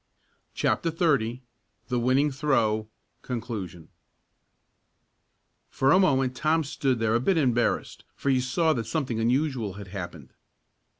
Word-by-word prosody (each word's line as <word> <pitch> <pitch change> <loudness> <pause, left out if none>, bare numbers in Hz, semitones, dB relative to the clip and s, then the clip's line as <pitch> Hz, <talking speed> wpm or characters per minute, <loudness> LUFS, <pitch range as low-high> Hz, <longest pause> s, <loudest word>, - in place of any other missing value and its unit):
CHAPTER 165 - +1
XXX 140 -8 +1 0.5
THE 125 -1 0
WINNING 130 +5 +2
THROW 115 -6 +1 0.3
CONCLUSION 105 -9 -6 1.8
For 135 +1 +2
a 185 - +6
moment 135 -8 +2
Tom 155 +4 +1
stood 135 -2 -1
there 115 -1 +1
a 115 - +3
bit 180 +8 +1
embarrassed, 120 -6 0
for 140 - 0
he 130 -1 +2
saw 160 +6 +1
that 115 -5 -3
something 130 -6 -2
unusual 125 -3 0
had 100 -1 -10
happened. 85 -8 -8
125 Hz, 125 wpm, -26 LUFS, 110-145 Hz, 1.8 s, a